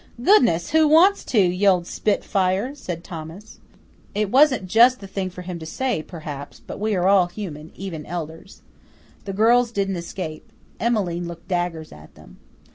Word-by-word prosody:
"Goodness, 240 - +4
who 315 -1 +4
wants 345 +7 +5
to, 235 - +1
you 185 +1 +2
old 180 -3 +3
spitfire?" 195 +4 0
said 175 - -7
Thomas. 170 +6 -10 0.6
It 210 -1 -1
wasn't 265 -6 +4
just 235 +6 +5
the 200 - -10
thing 190 -1 -4
for 180 0 -10
him 180 -1 -6
to 160 - -8
say, 245 +1 -2
perhaps, 150 -3 -9
but - - -9
we 215 0 0
are 180 0 +1
all 195 -2 +5
human, 175 -5 -8
even 170 -6 -7
elders. 165 +2 -7 0.6
The 195 - -4
girls 235 +4 +3
didn't 195 -3 -1
escape. 170 -2 -7 0.3
Emmeline 185 -7 -1
looked 170 0 -10
daggers 175 -3 -2
at 75 0 -15
them. - - -17
185 Hz, 165 wpm, -22 LUFS, 170-220 Hz, 0.6 s, wants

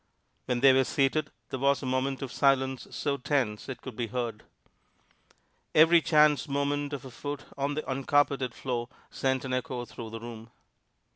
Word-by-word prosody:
When 125 -1 -1
they 135 -1 +8
were 130 0 +4
seated, 145 +3 +1 0.2
there 130 - -3
was 140 +1 +2
a - - -3
moment 130 +2 -1
of 130 - -5
silence 135 -1 +2
so 140 -2 -2
tense 125 -6 -1
it 125 -2 -7
could 130 -4 -7
be 120 0 -2
heard. 115 -2 -3 1.3
Every 165 +2 +7
chance 150 -6 +4
movement 140 +1 -1
of 135 -2 -5
a 130 - -9
foot 145 +3 -5
on 140 +1 -1
the 155 - -4
uncarpeted 135 -1 +1
floor 120 -2 -3 0.2
sent 130 0 0
an 130 - -3
echo 125 -1 -2
through 115 -1 -8
the 115 +1 -6
room. 115 -1 -9
135 Hz, 170 wpm, -29 LUFS, 125-140 Hz, 1.3 s, they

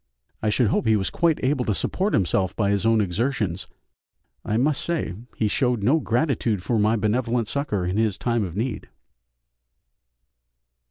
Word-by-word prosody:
I 110 - +1
should 110 +1 +2
hope 115 - 0
he 110 - +5
was 95 -2 -1
quite 165 -3 +1
able 130 0 +1
to 105 -4 0
support 195 - 0
himself 95 0 +1
by 100 -2 +1
his 100 +2 +1
own 115 -1 +4
exertions. 100 -2 -1 0.8
I 110 - -1
must 140 +3 +1
say 170 - -2 0.2
he 110 - 0
showed 120 0 0
no 140 +10 +4
gratitude 120 - 0
for 115 +2 0
my 110 +2 +3
benevolent 115 +2 0
succour 105 -10 -2
in 90 +3 -1
his 110 -3 +1
time 120 -2 0
of 90 -3 -5
need. 110 0 -3
110 Hz, 165 wpm, -24 LUFS, 105-130 Hz, 0.8 s, he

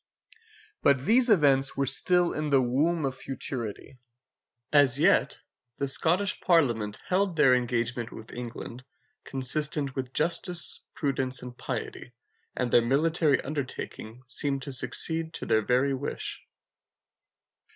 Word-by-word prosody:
But 140 -1 +3
these 240 +4 +4
events 140 -9 +3
were 140 - +1
still 175 +7 +1
in 155 0 -2
the 140 -2 +4
womb 145 +6 +1
of 135 -1 -2
futurity. 130 -2 -6 0.7
As 140 -3 +5
yet - - +3 0.4
the 140 - -1
Scottish 175 +8 +1
Parliament 120 - +1
held 185 -1 +1
their 140 -5 +5
engagement 120 -1 -1
with 110 - -11
England 120 0 -7 0.4
consistent 140 +1 0
with 130 -1 -4
justice, 170 +3 +1
prudence, 130 -3 -2
and 125 -1 -8
piety, 125 0 -6 0.4
and 125 -2 -1
their 120 - +6
military 150 +4 +2
undertaking 130 -4 -6
seemed 135 +1 -2
to 140 - -6
succeed 160 +5 -1
to - - -5
their 110 -1 +2
very 125 +5 +1
wish. 135 +2 -4
135 Hz, 125 wpm, -27 LUFS, 125-155 Hz, 0.7 s, their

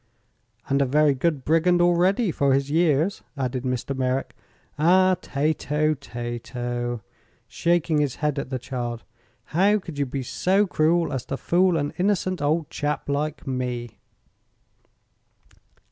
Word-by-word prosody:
"And 140 +1 +2
a - - +3
very 150 +2 +4
good 140 0 -1
brigand, 170 +3 +3
already, 175 +4 +3
for 140 -3 +2
his 140 +1 -1
years," 165 +3 +2 0.2
added 130 -1 -2
Mr. 130 +1 -2
Merrick. 130 0 -1 0.5
"Ah, 185 +4 +5
Tato, 150 +1 0
Tato," 120 -2 -5 0.4
shaking 170 -2 +1
his 145 -4 0
head 150 -2 -1
at 140 - -5
the 130 - -2
child, 120 -2 -5 0.5
"how 200 +6 +4
could 170 -7 -8
you 140 - 0
be 135 +1 -4
so 190 - +1
cruel 170 -1 +1
as 130 -2 -2
to 135 - -4
fool 180 +2 +2
an 145 -1 -2
innocent 185 -2 0
old 155 +2 +1
chap 145 0 -2
like 150 +2 -2
me?" 125 -3 -4
145 Hz, 135 wpm, -24 LUFS, 130-170 Hz, 0.5 s, Ah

